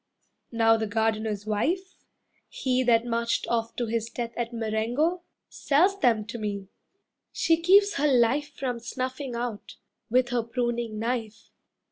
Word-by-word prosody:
Now 225 -1 +4
the 220 0 -2
Gardener's 215 -1 -1
wife, 335 - -1 0.6
He 260 - 0
that 235 -1 +4
marched 235 0 0
off 230 -1 -1
to 240 - -1
his 230 0 -2
death 235 0 -5
at 240 0 -3
Marengo, 235 +10 0 0.3
Sells 365 +8 +2
them 230 - +2
to 230 +2 -7
me; 200 -2 -4 0.6
she 330 0 +2
keeps 400 +4 +5
her 295 +1 +2
life 260 +4 +3
From 250 -3 -3
snuffing 255 +2 -4
out, 235 -3 -5 0.3
with 250 +2 +3
her 245 -1 +1
pruning 235 -1 -2
knife. 225 -2 -4
235 Hz, 140 wpm, -26 LUFS, 225-260 Hz, 0.6 s, keeps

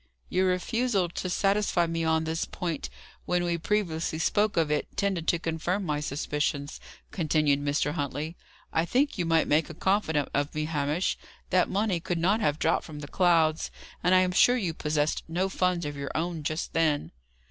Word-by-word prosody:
"Your 185 +1 +2
refusal 195 +1 +1
to 185 +2 -4
satisfy 195 -2 +2
me 165 0 -2
on 160 0 +2
this 160 +1 -2
point, 170 -4 -4 0.4
when 180 0 +1
we 170 -1 0
previously 165 -3 -1
spoke 205 +5 +1
of 160 -2 +2
it, 150 - 0
tended 190 -5 0
to 170 - +3
confirm 165 +4 -2
my 150 -2 -1
suspicions," 145 0 -2 0.3
continued 150 -5 +1
Mr. 145 +1 +1
Huntley. 150 +1 -3 0.4
"I 160 - +2
think 255 - +1
you 170 - 0
might 165 -1 +3
make 155 +2 +2
a 160 - -8
confidant 160 -7 +1
of 145 +1 -1
me, 155 0 -1
Hamish. 150 +2 -1 0.3
That 185 -1 +3
money 200 -2 0
could 175 +1 -2
not 190 +6 +2
have 150 -9 +1
dropped - - +1
from 150 -2 -9
the 145 - -7
clouds; 165 -2 +2 0.3
and 180 +2 +4
I 185 - +6
am 185 0 +1
sure 245 +7 +5
you 185 -8 -1
possessed 150 -1 0
no 180 +4 0
funds 180 -3 0
of 145 0 -4
your 140 -1 -4
own 165 0 -2
just 155 +2 -3
then." 155 -3 +1
165 Hz, 185 wpm, -28 LUFS, 150-185 Hz, 0.4 s, I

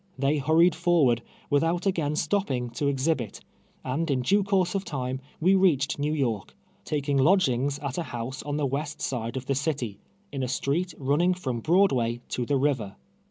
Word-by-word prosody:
They 140 +3 +1
hurried 160 +5 +4
forward, 160 -9 +3 0.3
without 165 +5 +1
again 160 -6 0
stopping 135 -11 -1
to 140 +4 -1
ex 135 +1 -1
hibit, 125 -11 -1 0.4
and 150 +6 -2
in 130 -3 +1
duo 200 +11 +3
course 190 -2 +1
of 195 -1 -1
time, 130 -5 -4 0.2
we 185 +4 +4
reached 165 -8 +2
Xew 150 +2 0
York, 115 -8 -2 0.3
taking 145 -2 -1
lodgings 140 -4 +3
at 140 0 -4
a 170 - -4
house 120 +2 -5
on 145 0 -3
the 150 - 0
west 145 +3 -3
side 120 -1 -3
of 130 - -5
the 140 - 0
city, 135 -7 -2 0.3
in 135 - -4
a 130 - -1
street 155 +8 -1
running 150 +7 +2
from 130 -10 -3
Broadway 130 - +2
to 120 -2 -2
the 140 - +2
river. 130 -8 0
140 Hz, 180 wpm, -26 LUFS, 130-165 Hz, 0.4 s, hurried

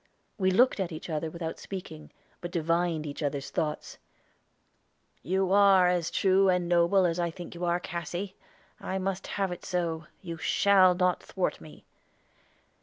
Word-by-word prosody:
We 190 -1 +3
looked 235 +5 +3
at 185 -3 -2
each 160 +1 -7
other 155 +1 -2
without 165 0 -6
speaking, 165 -5 -8 0.3
but 175 - -5
divined 170 -1 0
each 145 +1 -6
other's 140 -2 -3
thoughts. 150 -1 -3 1.2
"You 190 +5 0
are 195 -2 +6
as 175 -2 0
true 195 0 +3
and 180 -1 +1
noble 175 +2 +3
as 170 0 0
I 170 -1 0
think 175 +1 -9
you 175 +1 -4
are, 175 0 +1
Cassy. 175 +3 -5 0.4
I 190 - -3
must 190 0 -3
have 195 -2 0
it 175 - -7
so. 165 -3 -2 0.2
You 170 -2 -6
shall 185 +1 +4
not 180 0 +1
thwart 185 - -3
me." 75 -2 -14
175 Hz, 160 wpm, -28 LUFS, 165-190 Hz, 1.2 s, are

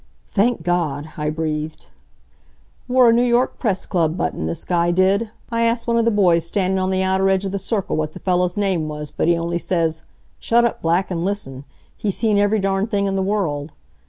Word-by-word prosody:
"Thank 215 -3 +1
God!" 160 -4 -1
I 150 0 -2
breathed. 155 0 -3 1.0
"Wore 250 -2 +5
a - - +3
New 235 - +3
York 245 +1 +1
Press 200 -6 -1
Club 165 -3 0
button, 80 - -2
this 80 - -4
guy 175 -1 +1
did. 190 +5 +2 0.2
I 230 0 0
asked 230 0 +1
one 235 - +1
of 230 - +2
the - - +4
boys 180 -6 +3
standin' 190 +2 0
on 185 0 0
the 190 0 +1
outer 190 +1 +2
edge 190 0 +1
of 195 - -2
the 200 - -2
circle 195 0 -2
what 155 0 -2
the - - -9
fellow's 180 0 0
name 190 -6 0
was, 150 -1 -6
but - - -1
he 170 0 +4
only 170 +1 -2
says: 165 -2 -1 0.4
'Shut 235 +1 +3
up 235 - -2
Black! 170 +4 +1
An' 170 -1 -2
listen. 145 -9 -3 0.3
He's 200 -3 -2
seen 215 -3 +2
every 205 +1 +2
darn 195 0 0
thing 200 -3 0
in 195 -1 -1
the 190 - 0
world.' 165 -7 -2
190 Hz, 215 wpm, -20 LUFS, 165-205 Hz, 1.0 s, Wore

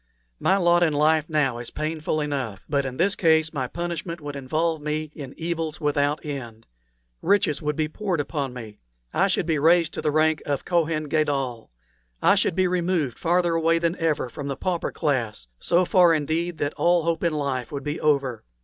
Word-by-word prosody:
My 190 - +3
lot 175 -2 +4
in 165 -3 +3
life 155 +1 +2
now 135 -6 +1
is 120 - -6
painful 155 0 -2
enough; 135 -9 -3
but 140 -2 0
in 130 -1 -6
this 195 +4 +2
case 160 -2 +3
my 130 -4 -2
punishment 170 +2 -4
would 145 -2 -7
involve 155 +4 -1
me 150 0 -3
in 140 -3 -9
evils 165 -2 -3
without 145 0 0
end. 120 -6 -6 0.6
Riches 190 -6 +2
would 150 -1 -1
be 155 0 0
poured 180 +1 -2
upon 145 -2 -2
me; 110 -4 -9 0.3
I 195 - +3
should 185 - 0
be 160 -3 +1
raised 165 +1 +4
to - - -4
the 150 - +1
rank 155 +1 +2
of 140 -2 -2
Kohen 165 -3 +1
Gadol; 140 -6 -1 0.5
I 195 - +5
should 195 -4 +1
be 185 0 +3
removed 175 -7 0
farther 175 0 +2
away 165 0 +2
than 170 +1 0
ever 160 -5 0
from 140 +4 -7
the 135 - -3
pauper 180 -3 -2
class 120 - -1
so 180 +2 +2
far, 175 -2 +5
indeed, 160 +3 -1
that 145 -1 -1
all 175 -1 +3
hope 165 0 -1
in 170 -2 +1
life 135 -5 -2
would 140 -2 -5
be 145 +2 -3
over. 140 -5 +1
155 Hz, 195 wpm, -24 LUFS, 140-170 Hz, 0.6 s, I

